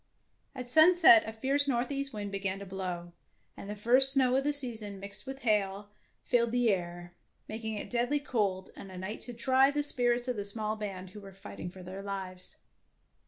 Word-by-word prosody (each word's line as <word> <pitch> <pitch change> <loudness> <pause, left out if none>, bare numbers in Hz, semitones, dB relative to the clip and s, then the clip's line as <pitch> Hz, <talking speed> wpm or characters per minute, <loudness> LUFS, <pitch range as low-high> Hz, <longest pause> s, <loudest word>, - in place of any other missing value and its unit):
At 250 -1 -7
sunset 315 -3 +6
a - - -4
fierce 275 +5 -1
northeast 275 +2 -2
wind 205 -2 -6
began 195 -1 -4
to 200 - -9
blow, 180 -2 -7 0.4
and 200 - -10
the 210 - -5
first 250 +6 +8
snow 260 -2 +2
of 270 - +1
the 295 - +1
season 225 -8 +2
mixed 200 +6 -7
with 270 0 -8
hail 205 -2 -1 0.3
filled 235 -1 0
the 245 -2 +2
air, 175 -2 -5 0.3
making 220 0 -6
it 205 - -8
deadly 245 +4 0
cold 205 -9 -3
and 195 - -11
a 185 - -10
night 190 +4 -7
to 245 - -9
try 260 +3 +2
the 290 +1 -2
spirits 245 -3 +1
of 250 -3 -3
the 205 - -3
small 215 +1 0
band 190 -3 -8
who 210 - -12
were 195 -1 -13
fighting 195 -2 -9
for 185 +1 -13
their 185 +2 -9
lives. 190 -2 -7
215 Hz, 195 wpm, -29 LUFS, 195-255 Hz, 0.4 s, first